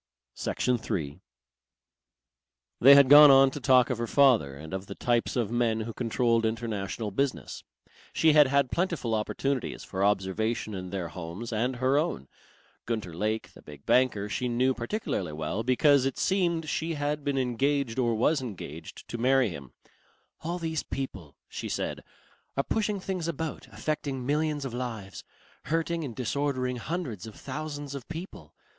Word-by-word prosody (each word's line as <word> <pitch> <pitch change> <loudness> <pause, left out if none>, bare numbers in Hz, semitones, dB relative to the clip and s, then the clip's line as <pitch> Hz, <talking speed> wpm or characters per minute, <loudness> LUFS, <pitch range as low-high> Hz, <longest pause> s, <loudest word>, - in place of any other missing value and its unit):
Section 125 -1 -1
3 75 -9 -4 1.6
They 140 +3 +9
had 140 -1 +7
gone 145 +2 +10
on 135 0 +7
to 145 - -6
talk 130 -1 +4
of 120 - -2
her 120 - -2
father 120 - +4
and 80 +5 -10
of 95 +1 -4
the 100 - -7
types 120 -1 0
of 115 -4 0
men 115 -2 +1
who 115 +1 -5
controlled 115 0 +1
international 110 -2 -3
business. 135 +7 -2 0.5
She 160 -1 +4
had 150 -2 +7
had 140 -1 +2
plentiful 170 -10 -1
opportunities 125 +4 -2
for 95 0 -3
observation 105 +3 0
in 90 -1 -5
their 90 -3 -4
homes 90 +8 -7
and 125 +4 0
her 130 +3 +2
own. 70 - -2 0.6
Gunter 110 -7 -3
Lake, 110 +6 -2
the - - -15
big 75 -2 -13
banker, 125 -5 +2
she 125 +4 -2
knew 125 +2 +2
particularly 120 - -3
well, 80 +7 -3
because, 130 +3 +4
it 135 -1 -1
seemed, 170 -4 +1
she 160 +1 -2
had 145 0 -2
been 140 -1 -1
engaged 130 0 0
or 120 -2 +2
was 140 +6 +2
engaged 85 - -8
to 120 - -5
marry 130 -1 +3
him. 70 -7 -9 0.7
"All 170 +3 -3
these 160 -3 -2
people," 95 - -6
she - - -6
said, - - -3 0.5
"are 140 - +2
pushing 210 +1 -1
things 185 -3 -3
about, 160 -1 -4
affecting 140 -4 -3
millions 150 0 0
of 130 - -5
lives, 115 -6 -5 0.4
hurting 165 +1 -1
and 125 -6 -6
disordering 130 0 -1
hundreds 120 - -4
of 110 - -10
thousands 145 -2 -6
of 135 -3 -7
people. 165 +3 -9
125 Hz, 160 wpm, -28 LUFS, 110-145 Hz, 1.6 s, gone